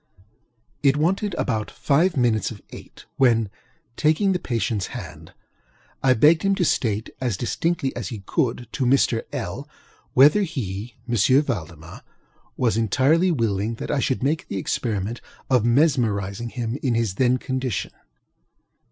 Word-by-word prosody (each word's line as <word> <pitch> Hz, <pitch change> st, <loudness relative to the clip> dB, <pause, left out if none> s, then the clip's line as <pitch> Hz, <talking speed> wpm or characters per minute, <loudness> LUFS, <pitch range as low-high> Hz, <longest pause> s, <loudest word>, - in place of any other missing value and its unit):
It 140 Hz, 0 st, +3 dB
wanted 190 Hz, +5 st, 0 dB
about 110 Hz, -8 st, -1 dB
five 160 Hz, +4 st, +1 dB
minutes 120 Hz, -4 st, +2 dB
of 110 Hz, -, -9 dB
eight -, -, -12 dB
when, 115 Hz, -6 st, +3 dB, 0.4 s
taking 160 Hz, +6 st, +2 dB
the 180 Hz, -, 0 dB
patientŌĆÖs 115 Hz, -, -1 dB
hand, -, -, -10 dB, 0.7 s
I 130 Hz, -1 st, +4 dB
begged 155 Hz, +8 st, +5 dB
him 195 Hz, 0 st, +2 dB
to 180 Hz, -, +1 dB
state, 110 Hz, -7 st, 0 dB
as 120 Hz, -7 st, -1 dB
distinctly 140 Hz, -, -1 dB
as 120 Hz, -5 st, -4 dB
he 105 Hz, -2 st, -7 dB
could, 125 Hz, -6 st, -1 dB
to 130 Hz, -, -1 dB
Mr. 125 Hz, -3 st, +3 dB
LŌĆöl, -, -, -5 dB, 0.5 s
whether 145 Hz, +10 st, +6 dB
he 115 Hz, -, -4 dB
(M. 125 Hz, +4 st, +3 dB
Valdemar) 85 Hz, -, -6 dB, 0.6 s
was 115 Hz, -3 st, +1 dB
entirely 140 Hz, -, +3 dB
willing 115 Hz, -, 0 dB
that -, -, -5 dB
I 145 Hz, -, +1 dB
should 130 Hz, -1 st, -1 dB
make 155 Hz, +4 st, 0 dB
the -, -, -4 dB
experiment 105 Hz, +2 st, -2 dB, 0.3 s
of 125 Hz, -4 st, +3 dB
mesmerizing 120 Hz, -, +1 dB
him 120 Hz, +2 st, -4 dB
in 125 Hz, -4 st, 0 dB
his 115 Hz, -4 st, 0 dB
then 125 Hz, +4 st, +2 dB
condition. 130 Hz, -3 st, -3 dB
125 Hz, 145 wpm, -23 LUFS, 110-145 Hz, 0.7 s, whether